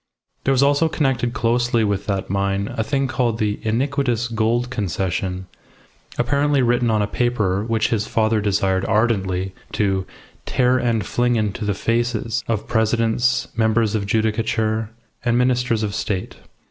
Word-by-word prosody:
There 135 - +3
was 135 0 +3
also 145 +3 +3
connected 135 -6 0
closely 120 -1 +1
with 100 -2 -1
that 100 -2 -1
mine 100 +1 -1
a 110 - 0
thing 135 +3 0
called 120 -3 0
the 105 -2 -1
"iniquitous 120 0 0
Gould 120 +2 0
Concession," 95 -3 -2 0.7
apparently 140 +2 +2
written 120 0 +2
on 110 -2 +2
a - - +2
paper 105 -5 0
which 115 0 0
his 110 -2 0
father 110 -1 +1
desired 95 -2 +1
ardently 95 -4 0 0.2
to 95 -3 0 0.4
"tear 125 0 +2
and 115 -3 0
fling 120 0 +1
into 105 -1 -1
the 100 -1 0
faces" 115 +1 -1
of 115 -3 -2
presidents, 115 +2 +1
members 110 -1 +2
of 100 -2 -1
judicature, 110 0 0 0.3
and 120 0 +2
ministers 125 -2 +1
of 105 -1 -2
State. 100 -3 -3
115 Hz, 145 wpm, -21 LUFS, 105-120 Hz, 0.7 s, There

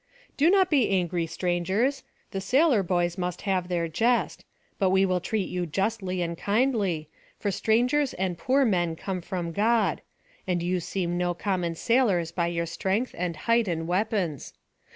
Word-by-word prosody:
"Do 305 +4 +4
not 380 -1 +4
be 275 -6 +3
angry, 175 -3 0
strangers; 190 - 0 0.3
the 195 -2 -3
sailor 260 - +3
boys 175 -1 0
must 180 -1 -3
have 185 -3 0
their 170 -2 -1
jest. 230 +10 0 0.4
But 195 -3 +3
we 190 +1 +4
will 185 -1 +1
treat 205 +2 -2
you 180 -1 -3
justly 190 +1 -1
and 170 0 -3
kindly, 200 - 0 0.3
for 205 - -1
strangers 245 +8 +1
and 185 -1 -1
poor 265 +10 +2
men 175 -6 +1
come 185 +2 -4
from 175 -1 -4
God; 225 +6 +1 0.5
and 175 -2 0
you 180 +1 0
seem 175 0 -2
no 175 -1 0
common 180 -3 -1
sailors 195 -6 +2
by 170 0 0
your 170 0 -1
strength, 195 +8 -1
and 175 -1 -2
height, 230 -1 +3
and 165 -2 -2
weapons. 185 - -1
185 Hz, 165 wpm, -26 LUFS, 175-225 Hz, 0.5 s, Do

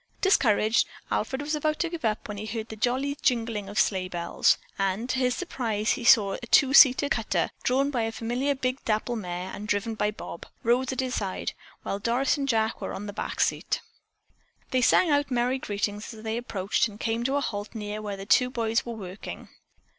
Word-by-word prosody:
Discouraged, 230 - +3 0.2
Alfred 265 +6 -1
was 300 +2 -2
about 305 0 0
to 345 - 0
give 330 -2 -6
up 215 -1 -1
when 210 -1 -6
he 215 +2 -5
heard 220 +1 -4
the 220 - -6
jolly 260 +5 0
jingling 225 -5 0
of 205 - -7
sleigh 185 -2 +2
bells, 175 -2 +2 0.2
and 195 +4 0
to 260 - 0
his 250 -1 +2
surprise 230 - -2 0.2
saw 200 -3 +6
a 235 - -8
two 270 +3 +5
seated 275 +1 +7
cutter, - - 0
drawn 275 +3 +1
by 250 -4 0
a 225 0 -1
familiar 245 +5 -1
big 255 0 -2
dapple 220 +2 0
mare 180 -3 -4
and 210 - -6
driven 205 +2 0
by 210 -1 0
Bob. 210 -5 -8 0.2
Rose 245 +3 +3
sat - - -1
at 260 - -5
his 255 - -4
side, 195 -5 -2 0.3
while 200 - -3
Doris 240 +5 +1
and 275 -1 -2
Jack 220 -2 +1
were - - -4
on 200 - -6
the 205 - -6
back - - -5
seat. - - 0 0.9
They 255 - +2
sang 320 +7 +4
out 285 -1 +2
merry 250 +1 +1
greetings 205 -1 -3
as 215 - -12
they 220 0 -2
approached 210 -4 0
and 210 -1 -12
came 230 0 -1
to 270 +2 +1
a - - +3
halt 205 -3 -4
near 210 0 -4
where 205 -2 -4
the 195 - -7
two 250 +4 +4
boys 230 -3 0
were 235 - -5
working. 195 -3 -8
225 Hz, 210 wpm, -27 LUFS, 210-260 Hz, 0.9 s, seated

